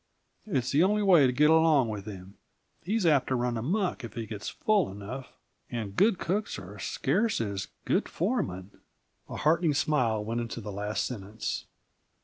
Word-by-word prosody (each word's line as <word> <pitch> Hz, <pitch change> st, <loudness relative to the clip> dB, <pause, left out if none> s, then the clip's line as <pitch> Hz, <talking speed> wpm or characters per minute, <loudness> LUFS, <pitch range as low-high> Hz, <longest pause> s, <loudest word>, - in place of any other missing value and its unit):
It's 130 Hz, -, 0 dB
the 145 Hz, -, +4 dB
only 210 Hz, +2 st, +2 dB
way 175 Hz, -9 st, +6 dB
to -, -, +1 dB
get 150 Hz, +5 st, +4 dB
along 160 Hz, -6 st, +4 dB
with 105 Hz, -1 st, -5 dB
him 95 Hz, -1 st, -9 dB, 0.4 s
he's 210 Hz, +1 st, 0 dB
apt 145 Hz, -5 st, +4 dB
to 130 Hz, -, +1 dB
run 120 Hz, -1 st, 0 dB
amuck, 175 Hz, -, -1 dB
if 115 Hz, -, -8 dB
he 115 Hz, -2 st, -3 dB
gets 105 Hz, -2 st, -5 dB
full 210 Hz, -6 st, +1 dB
enough; 105 Hz, +7 st, -8 dB, 0.4 s
and 110 Hz, -5 st, -4 dB
good 205 Hz, -, +4 dB
cooks 205 Hz, +6 st, -2 dB
are 100 Hz, +2 st, -9 dB
as -, -, -5 dB
scarce 210 Hz, -, +1 dB
as 100 Hz, -4 st, -3 dB, 0.2 s
good -, -, +1 dB
foremen." 105 Hz, -, -2 dB, 0.5 s
A -, -, -6 dB
heartening 160 Hz, 0 st, +2 dB
smile 125 Hz, -8 st, +1 dB
went 115 Hz, +2 st, -2 dB, 0.2 s
with 115 Hz, -, -7 dB
the 105 Hz, -, -5 dB
last 105 Hz, +2 st, -2 dB
sentence. 105 Hz, -2 st, -5 dB
125 Hz, 175 wpm, -29 LUFS, 105-165 Hz, 0.5 s, way